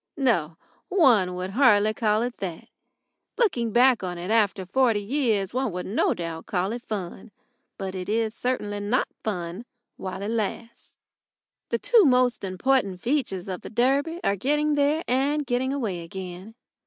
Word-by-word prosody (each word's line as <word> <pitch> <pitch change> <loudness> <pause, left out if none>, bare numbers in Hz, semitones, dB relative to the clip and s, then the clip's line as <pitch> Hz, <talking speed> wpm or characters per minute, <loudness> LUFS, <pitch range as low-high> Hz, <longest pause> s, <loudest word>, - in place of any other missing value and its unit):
No; 175 - +1 0.3
one 240 - +4
would 185 +1 -4
hardly 215 -3 +4
call 215 0 +1
it 245 0 -4
that. 180 -4 -6 0.7
Looking 250 - +1
back 250 +1 +5
on 180 -2 -4
it 180 +4 -4
after 205 -4 +2
forty 230 +2 +2
years 215 -3 0
one 255 -3 0
will 180 0 -4
no 205 - +1
doubt 165 -1 -6
call 185 +1 -1
it 240 +1 -4
fun. 200 -1 -6 0.5
But 190 -1 -4
it 185 0 -5
is 220 0 0
certainly 210 -5 -2
not 210 +6 0
fun 180 -1 -4 0.3
while 190 +1 -5
it 210 - -2
lasts. 230 +2 -4 0.7
The - - +1
two 465 -4 +4
most 250 -4 +3
important 195 0 0
features 235 -7 -1
of 185 -2 -5
the - - -8
Derby 275 +8 +1
are 200 - +2
getting 295 +8 +1
there 290 +3 +2
and 280 +4 +1
getting 255 +1 0
away 220 -11 -2
again. 185 +4 -8
220 Hz, 160 wpm, -25 LUFS, 190-260 Hz, 0.7 s, back